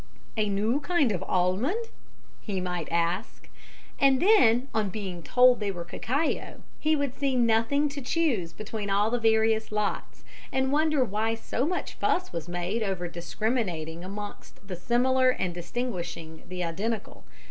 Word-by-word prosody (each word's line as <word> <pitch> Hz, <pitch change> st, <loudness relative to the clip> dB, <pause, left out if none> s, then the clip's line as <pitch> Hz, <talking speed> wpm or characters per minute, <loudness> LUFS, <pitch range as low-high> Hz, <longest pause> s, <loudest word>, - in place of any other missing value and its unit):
"A 215 Hz, -2 st, +1 dB
new 215 Hz, +7 st, +1 dB
kind 295 Hz, -5 st, +2 dB
of 180 Hz, -, -2 dB
almond?" 205 Hz, -, +1 dB, 0.6 s
he 200 Hz, -4 st, -3 dB
might 180 Hz, -3 st, -3 dB
ask. 170 Hz, +4 st, -1 dB, 0.5 s
And 270 Hz, -1 st, +5 dB
then, 275 Hz, -, +5 dB
on 215 Hz, -2 st, +1 dB
being 190 Hz, -3 st, -5 dB
told 250 Hz, +6 st, +5 dB
they 205 Hz, -2 st, -1 dB
were 175 Hz, -3 st, -4 dB
cacao, 280 Hz, -, -2 dB, 0.2 s
he 310 Hz, 0 st, +2 dB
would 285 Hz, -3 st, -1 dB
see 275 Hz, -2 st, 0 dB
nothing 235 Hz, +5 st, +3 dB
to 280 Hz, 0 st, -6 dB
choose 245 Hz, -, 0 dB
between 215 Hz, +1 st, -5 dB
all 205 Hz, +3 st, +2 dB
the 245 Hz, -, +1 dB
various 220 Hz, -1 st, +2 dB
lots 210 Hz, -1 st, -2 dB, 0.3 s
and 265 Hz, 0 st, +1 dB
wonder 305 Hz, -2 st, +3 dB
why 220 Hz, +1 st, 0 dB
so 245 Hz, +4 st, -2 dB
much 360 Hz, +1 st, -2 dB
fuss 365 Hz, -, 0 dB
was 170 Hz, -1 st, -4 dB
made 175 Hz, +6 st, -2 dB
over 190 Hz, -4 st, -1 dB
discriminating 175 Hz, -2 st, -2 dB
amongst 205 Hz, +1 st, -8 dB
the 185 Hz, -, -4 dB
similar 255 Hz, +7 st, +3 dB
and 185 Hz, -8 st, -1 dB
distinguishing 175 Hz, -4 st, -5 dB
the 180 Hz, -1 st, -3 dB
identical. 205 Hz, +7 st, -3 dB
220 Hz, 150 wpm, -27 LUFS, 180-255 Hz, 0.6 s, And